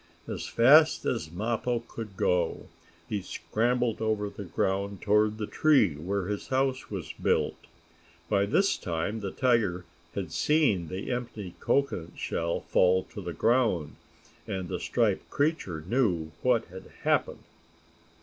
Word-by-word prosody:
As - - -4
fast 150 +7 +5
as 80 - -1
Mappo 115 +5 -1
could 105 -4 -8
go 90 -2 +1 0.4
he 105 -2 -2
scrambled 120 +4 -1
over 105 -2 0
the 100 - -8
ground 95 +3 -1
toward 105 +1 +3
the 110 - -2
tree 135 - +3
where 90 +6 -3
his 105 +1 -4
house 130 0 0
was 95 -5 -5
built. - - -1 0.6
By 100 -1 +2
this 190 - +2
time 85 +6 -2
the 100 -2 -3
tiger 105 -8 +1 0.3
had 95 -6 -3
seen 100 - +2
the 95 +7 -5
empty 115 -7 -4
cocoanut 115 -12 0
shell 85 0 -2
fall 95 0 +3
to 105 - -6
the 90 -2 -5
ground, 110 - +1 0.5
and 95 -4 -4
the - - -3
striped - - 0
creature 140 - -1
knew 90 -10 +1
what 125 -3 +2
had 95 +1 -11 0.2
happened. - - +1
105 Hz, 140 wpm, -28 LUFS, 90-120 Hz, 0.6 s, fast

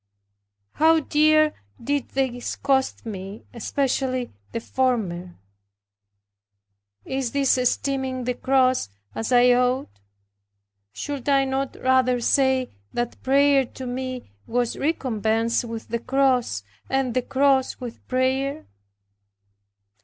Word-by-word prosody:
How 320 +1 +4
dear 310 +1 +4 0.3
did 285 +3 -2
these 255 -3 -2
cost 265 -3 0
me, 195 -1 -7
especially 255 +1 -1 0.2
the - - -2
former! 210 -9 -1 1.7
Is 265 -3 -2
this 280 -2 +3
esteeming 260 0 -1
the 250 +1 -1
cross 255 - +2 0.2
as 225 +2 -3
I 245 0 +6
ought? 250 - 0 0.9
should 285 - -4
I 275 -1 +4
not 270 0 -2
rather 255 -1 +3
say 265 +1 +2 0.2
that 240 0 -3
prayer 275 +1 +4
to 260 +1 -9
me 255 - -5 0.2
was 240 0 0
recompensed 230 -6 0
with 230 -1 -7
the 235 +1 -1
cross, 255 - +1 0.3
and 265 -2 0
the 255 - +1
cross 265 0 +2
with 245 -3 -8
prayer. 260 - 0
255 Hz, 110 wpm, -24 LUFS, 240-270 Hz, 1.7 s, I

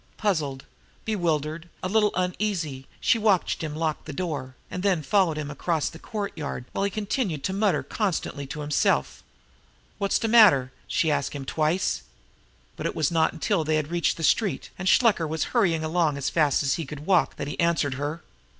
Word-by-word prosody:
Puzzled, 150 -10 -1 0.4
bewildered, 165 -5 -1
a - - 0
little 210 +1 +3
uneasy, 180 -7 -2
she 230 - +3
watched 210 -4 +2
him 155 -2 -4
lock 155 -1 -2
the - - -6
door, 140 -6 -4 0.2
and 180 - -3
then 185 -5 +1
followed 170 0 +2
him 150 -1 -4
across 160 +1 -1
the 165 - -12
courtyard, 170 - -5
while - - -2
he 200 - +2
continued 205 - -2
to 190 - -1
mutter 195 -5 +1
constantly 170 -8 -2
to 150 +2 -6
himself. 145 0 +1 0.8
"Wot's 200 -1 +2
de 225 - -1
matter?" 205 - +6 0.2
she 160 - +1
asked 140 -2 -1
him 140 -2 -6
twice. 155 - 0 0.8
But - - -2
it - - -4
was 155 -1 +1
not 160 -1 +3
until 200 -7 0
they 155 0 +1
had 155 +1 -1
reached 170 -1 +1
the 165 - -5
street, 205 +6 +1
and 185 0 -1
Shluker 210 -9 +4
was 160 0 -1
hurrying 175 -10 +2
along 160 -2 +1
as 140 0 -2
fast 150 -5 +2
as 135 - +2
he 165 - -3
could 150 +1 -8
walk, 185 -1 +3
that 140 - -5
he 145 - -6
answered 170 -5 +2
her. 145 +4 -4
165 Hz, 185 wpm, -26 LUFS, 150-195 Hz, 0.8 s, matter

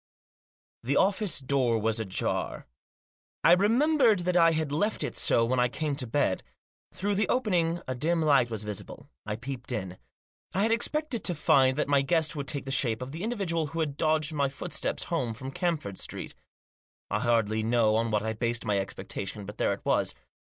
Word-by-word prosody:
The 135 +4 0
office 195 -2 +2
door 130 -3 +1
was 110 +1 0
ajar. 100 -4 -2 0.8
I - - +7
remembered 230 - +4
that 180 0 -1
I 165 -1 +6
had 155 -2 -1
left 205 +9 0
it - - -3
so 115 - +3
when 125 +2 0
I 125 - +4
came 145 +3 -2
to 130 -4 -3
bed. 115 -6 +1 0.5
Through 205 +2 -2
the 205 0 0
opening 175 -9 +1
a 130 - -1
dim 160 +7 0
light 140 -6 +4
was 110 -2 -3
visible. 105 -2 -7 0.2
I 105 - -2
peeped 125 +2 -7
in. 95 -6 -4 0.6
I 195 - +2
had 225 - +2
expected 255 +2 0
to 175 - 0
find 140 -4 +3
that 150 - 0
my 140 -1 +3
guest 160 +2 +1
would 140 -2 -4
take 140 -2 -2
the 135 - -4
shape 125 -3 +1
of 130 - -7
the 160 +3 -6
individual 190 -8 -1
who 165 +3 -5
had 150 -3 -1
dogged 155 0 +1
my 140 -2 +1
foot 135 - -7
steps - - -2
home 115 -3 -2
from 130 +3 -7
Camford 150 - -2
Street. - - -5 0.8
I 105 - +1
hardly 110 -2 +1
know 110 -1 +2
on 115 +1 +1
what 105 -1 0
I 110 0 -1
based 120 +1 -2
my 105 -2 +1
expectation, 100 +1 -5
but 105 +2 -10
there - - +2
it - - -5
was. - - +1
140 Hz, 195 wpm, -28 LUFS, 115-170 Hz, 0.8 s, I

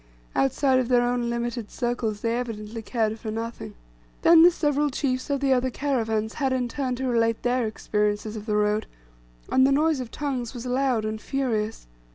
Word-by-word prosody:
Outside 260 - +2
of 255 - 0
their 245 -1 +4
own 245 -1 0
limited 235 -2 -3
circles 240 -4 -2
they 230 0 0
evidently 225 -2 -4
cared 220 -1 -1
for 220 - -5
nothing. 230 +2 -5 0.5
Then 335 -1 +8
the 345 - +9
several 295 -3 +1
chiefs 260 0 -2
of 280 -1 0
the 270 -1 +3
other 255 0 +1
caravans 225 -5 -1
had 270 -3 0
in 250 -1 0
turn 255 0 -2
to 265 +2 -3
relate 230 -2 +1
their 245 -1 +1
experiences 210 0 -1
of 215 +1 -7
the 210 - +1
road; 210 +1 +1 0.6
and 260 0 +5
the - - +2
noise 305 +1 +2
of 250 -3 -5
tongues 265 -4 -3
was 240 0 -6
loud 250 -3 +1
and 215 0 -3
furious. 225 -5 -2
240 Hz, 190 wpm, -25 LUFS, 220-265 Hz, 0.6 s, the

